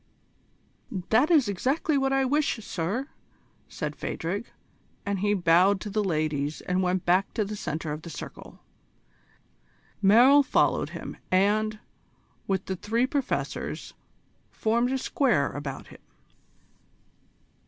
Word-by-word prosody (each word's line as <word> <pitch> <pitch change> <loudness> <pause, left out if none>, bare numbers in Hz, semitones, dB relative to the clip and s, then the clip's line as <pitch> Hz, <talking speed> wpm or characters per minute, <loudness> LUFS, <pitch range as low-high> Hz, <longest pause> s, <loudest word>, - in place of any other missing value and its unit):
"That 250 +7 +4
is 300 -9 +5
exactly 265 - 0
what 270 -1 +1
I 270 0 +2
wish, 290 +3 +1
sir," 200 - -3 0.6
said - - -4
Phadrig, 195 +7 -4 0.6
as 200 -1 -1
he 205 +1 +2
bowed 180 +2 +4
to 210 - -5
the 210 +1 0
ladies 155 -4 -1
and 180 +1 0
went 185 0 0
back 185 +3 +2
to 215 - +1
the 210 +2 -5
centre 160 -5 -4
of 150 +1 -5
the 170 - -9
circle. - - -10 1.4
Merrill 245 +8 +7
followed 275 - +1
him, - - -8
and, 210 +3 +2 0.7
with 190 -1 -1
the 190 - -3
three 225 +6 0
Professors, 275 0 -3 0.6
formed 235 +3 0
a 265 - +1
square 240 - +1
about 140 -1 -6
him. - - -15
205 Hz, 125 wpm, -27 LUFS, 180-250 Hz, 1.4 s, Merrill